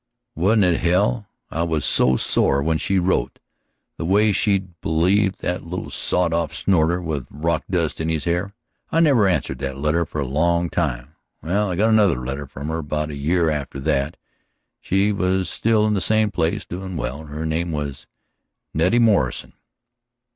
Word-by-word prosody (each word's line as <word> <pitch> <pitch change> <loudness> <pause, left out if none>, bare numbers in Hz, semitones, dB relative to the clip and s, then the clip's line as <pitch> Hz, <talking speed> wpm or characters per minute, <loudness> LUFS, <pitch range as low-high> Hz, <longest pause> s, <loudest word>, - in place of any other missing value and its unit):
"Wasn't 100 +6 +3
it 90 -2 +2
hell? 100 +5 +1 0.2
I 80 - -2
was 80 -3 0
so 65 - +3
sore 70 +2 +1
when 80 +1 +1
she 95 - 0
wrote, 90 +1 0 0.6
the - - -4
way 105 +5 +3
she'd 95 -4 0
believed 95 +5 +1
that 90 +1 -2
little 90 +2 -6
sawed 90 -2 0
off 85 -3 -1
snorter 85 -2 +2
with 80 -6 -4
rock 80 +3 -2
dust 85 -4 -1
in 80 - -1
his 80 -3 -1
hair, 90 +4 -2 0.4
I 165 - +2
never 135 -11 +4
answered 70 -8 -1
that 65 -1 -4
letter 75 +4 +1
for 75 - -5
a 70 - -1
long 85 +5 +1
time. 70 -4 -2 0.3
Well, 100 +5 0
I 90 - -2
got 105 +5 +2
another 105 - +4
letter 70 +2 -4
from 70 +4 -7
her 80 +1 -2
about 75 0 -3
a - - -6
year 80 +3 +1
after 70 -2 -4
that. 70 +1 0 0.6
She 100 +2 +1
was 95 -2 0
still 110 -1 +2
in 105 - +1
the 100 - 0
same 110 +2 +2
place, 80 -3 -1
doin' 95 0 -6
well. 70 0 -4
Her 75 +2 -5
name 80 +2 -1
was 70 -2 -5 0.7
Nettie 90 +9 +2
Morrison." 105 - +2
85 Hz, 175 wpm, -22 LUFS, 75-95 Hz, 0.7 s, never